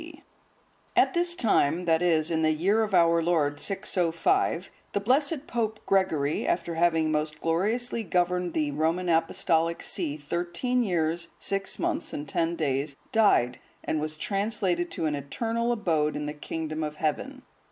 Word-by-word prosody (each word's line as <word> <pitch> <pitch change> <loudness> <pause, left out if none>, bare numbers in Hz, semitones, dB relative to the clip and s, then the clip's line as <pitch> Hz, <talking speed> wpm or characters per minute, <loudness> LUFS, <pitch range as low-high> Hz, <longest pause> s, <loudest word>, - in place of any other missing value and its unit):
D.] - - -12 0.7
At - - +4
this 345 0 +1
time, 180 - +2
that 165 -1 +3
is, 165 -2 +2
in 160 -1 +1
the 155 - +3
year 190 +8 +2
of 215 -3 0
our 170 -1 +4
Lord 160 -4 +1
605,(144) 180 -2 0 0.2
the - - +1
blessed 280 +7 +1
Pope 220 -2 -2
Gregory, 160 -7 +1
after 170 -1 0
having 165 -1 +2
most 150 0 -2
gloriously 220 +9 0
governed 180 -2 0
the 150 -2 0
Roman 165 +5 0
Apostolic 165 0 +1
see 165 -7 -2
thirteen 175 - -1
years, 170 -5 0
six 195 0 -2
months, 340 -2 -2
and 145 - -5
ten 165 +4 0
days, 140 -2 -1 0.2
died, 205 - +3 0.2
and 155 - -1
was 155 0 -4
translated 195 -2 -1
to 165 - -3
an 155 - 0
eternal 225 - -2
abode 160 -9 0
in 150 - -3
the 150 - -3
kingdom 155 +1 -4
of 150 0 -4
Heaven. 255 - -3
170 Hz, 155 wpm, -27 LUFS, 155-200 Hz, 0.7 s, At